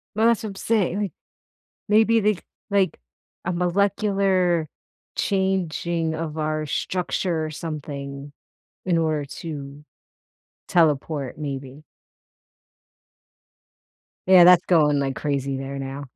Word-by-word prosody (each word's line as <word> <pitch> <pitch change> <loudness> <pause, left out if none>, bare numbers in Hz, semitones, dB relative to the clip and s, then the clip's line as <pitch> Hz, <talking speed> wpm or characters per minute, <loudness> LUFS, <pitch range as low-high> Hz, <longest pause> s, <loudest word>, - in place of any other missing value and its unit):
Well, 220 +1 +4
that's 235 0 +2
what 215 - -3
I'm - - -12
saying 205 -3 +1
and 210 - 0
it - - -16 0.8
maybe 220 +2 +5
they 210 0 +3
c - - -13 0.3
like, 200 -2 +1 0.5
a 185 - -1
molecular 185 -2 +1 0.5
changing 175 -4 0
of 160 -1 -4
our 155 0 -1
structure 175 +1 -1
or - - -6
something 140 -3 -6 0.5
in 180 -2 +2
order 155 -3 0
to 145 -1 -8 0.8
teleport, 150 -4 +1
maybe. 140 -1 -6 2.4
Yeah, 185 -2 +8
that's 180 0 +7
going, 150 -5 +4
like, 135 -1 -1
crazy 140 -2 -2
there 135 +1 -5
now. 135 +1 -5
165 Hz, 115 wpm, -23 LUFS, 145-190 Hz, 2.4 s, Yeah